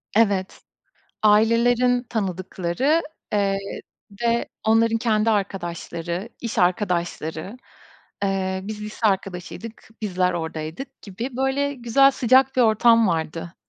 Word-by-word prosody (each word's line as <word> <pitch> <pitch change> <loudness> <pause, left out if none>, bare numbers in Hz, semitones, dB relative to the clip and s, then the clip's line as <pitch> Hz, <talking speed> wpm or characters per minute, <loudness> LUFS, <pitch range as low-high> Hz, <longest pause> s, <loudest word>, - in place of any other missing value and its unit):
Evet, 200 -4 +1 0.6
ailelerin 235 +3 +4
tanıdıkları, 195 - -1 0.3
eee, 200 -1 +1 0.6
ve 235 0 +1 0.2
onların 225 +1 +3
kendi 225 -1 +2
arkadaşları, 175 -2 -3
iş 230 -2 -4
arkadaşları, 175 0 -1 0.7
eee, 190 -1 -1
biz 210 +1 -6
lise 215 +1 -2
arkadaşıydık, 195 +3 -4
bizler 185 -3 +1
oradaydık 165 - -6
gibi 230 +6 -6
böyle, 280 +2 0
güzel, 260 +3 +4
sıcak 260 +1 +3
bir - - +4
ortam 230 0 +5
vardı. 165 0 -3
210 Hz, 100 wpm, -23 LUFS, 185-235 Hz, 0.7 s, ortam